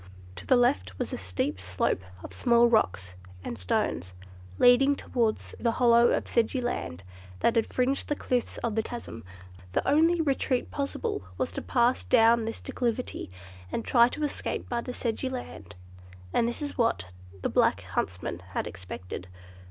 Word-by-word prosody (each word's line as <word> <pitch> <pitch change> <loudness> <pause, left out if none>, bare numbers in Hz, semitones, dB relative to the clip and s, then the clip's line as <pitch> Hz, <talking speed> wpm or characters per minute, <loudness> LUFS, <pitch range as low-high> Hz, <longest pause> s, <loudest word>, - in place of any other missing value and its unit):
To - - -7
the 260 - +6
left 95 - +2
was - - -3
a - - 0
steep 95 +4 -2
slope 95 0 0 0.2
of - - -8
small 235 -1 +4
rocks 95 - +1 0.3
and 120 - -4
stones, 90 -2 -1 0.4
leading 270 +3 +6
downwards 230 -5 -1
to - - -16
the 230 -1 +2
hollow 235 -1 +5
of - - 0
sedgy 235 +2 +1
land 100 - -3 0.4
that 230 -1 +2
fringed 260 +2 0
the 295 - +1
cliffs 250 -4 -1
of 235 -2 0
the 220 - +1
chasm. 220 - -7 0.5
The - - 0
only 325 +4 +4
retreat 270 -4 0
possible 410 - -2 0.2
was - - -1
to - - -4
pass 245 0 +2
down 230 -1 +4
this 225 - -5
declivity, 245 - -2 0.4
and 230 - -3
try 235 -2 +6
to 295 +5 -4
escape 295 - -3
by 240 -1 -1
the 250 - -5
sedgy 245 +1 -2
land, 105 - -7 0.6
and 235 - +3
this 240 +5 -3
is 285 -2 -5
what 95 - +1 0.3
the - - +1
black - - +3
huntsmen 90 -1 -3 0.2
had - - 0
expected. 90 0 -7
235 Hz, 165 wpm, -28 LUFS, -, 0.6 s, the